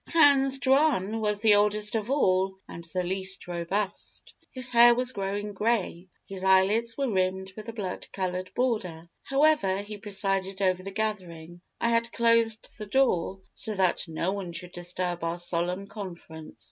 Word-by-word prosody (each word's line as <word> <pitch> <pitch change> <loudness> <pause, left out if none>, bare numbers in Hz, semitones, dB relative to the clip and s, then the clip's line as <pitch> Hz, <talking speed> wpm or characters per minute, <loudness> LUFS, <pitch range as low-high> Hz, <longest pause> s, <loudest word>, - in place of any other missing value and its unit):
Hans 280 -4 +5
Jaun 265 -7 +2
was 210 -1 0
the 215 -1 +5
oldest 210 +1 +3
of 220 0 -2
all 190 -8 +1
and 170 - -9
the 180 +2 -3
least 190 +1 -2
robust. 185 +4 -4 0.2
His 255 -1 -1
hair 240 0 +7
was 250 +1 +1
growing 205 0 -4
grey, 195 -4 -1 0.2
his 190 -1 -7
eyelids 200 +5 +3
were 275 -1 0
rimmed 190 -2 -1
with 215 +1 -8
a - - -6
blood 195 -5 -5
coloured 185 -1 -3
border. 185 -10 -2
However, 275 -9 +2
he 205 0 -8
presided 195 -1 -1
over 185 -2 +1
the 195 - -6
gathering. 180 -5 -5 0.2
I 235 - +1
had 230 0 +1
closed 230 -1 +1
the 210 - -6
door, 195 -6 +1
so 215 -2 -3
that 185 -3 +1
no 165 +3 -2
one 195 -4 -5
should 180 +1 -6
disturb 175 0 -3
our 165 +1 -2
solemn 175 +2 -2
conference. 170 -6 -10
195 Hz, 160 wpm, -27 LUFS, 185-230 Hz, 0.2 s, hair